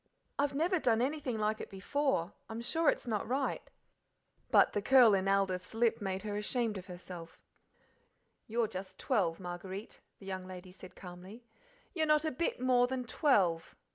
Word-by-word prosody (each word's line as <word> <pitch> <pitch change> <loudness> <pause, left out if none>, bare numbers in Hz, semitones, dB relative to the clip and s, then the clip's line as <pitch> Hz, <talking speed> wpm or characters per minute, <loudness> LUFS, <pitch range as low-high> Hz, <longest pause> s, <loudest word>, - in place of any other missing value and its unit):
"I've 285 -1 +1
never 345 +5 +2
done 230 -6 +2
anything 265 -2 -1
like 215 0 0
it - - -7
before. 200 - -1 0.2
I'm 225 +1 -5
sure 320 +7 +2
it's - - -1
not 215 -4 -2
right." 265 +3 -1 0.8
But - - +5
the 205 - 0
curl, 245 -1 +7
in 195 0 +1
Aldith's 195 0 0
lip 230 -1 +2
made 190 0 -3
her 210 -1 -3
ashamed 215 -1 -1
of 185 - -12
herself. 175 -2 -9 1.1
"You're 230 0 +1
just 185 -1 -7
twelve, 185 -10 0
Marguerite;" 185 +3 -7 0.2
the 195 - -14
young 190 -1 -5
lady 185 0 -9
said 185 0 -13
calmly: 185 +6 -11 0.5
"you're 320 -4 +1
not 305 +1 +4
a 315 - 0
bit 295 +2 -2
more 250 -1 +4
than 260 0 -2
twelve. 195 - +2
215 Hz, 170 wpm, -33 LUFS, 185-255 Hz, 1.1 s, curl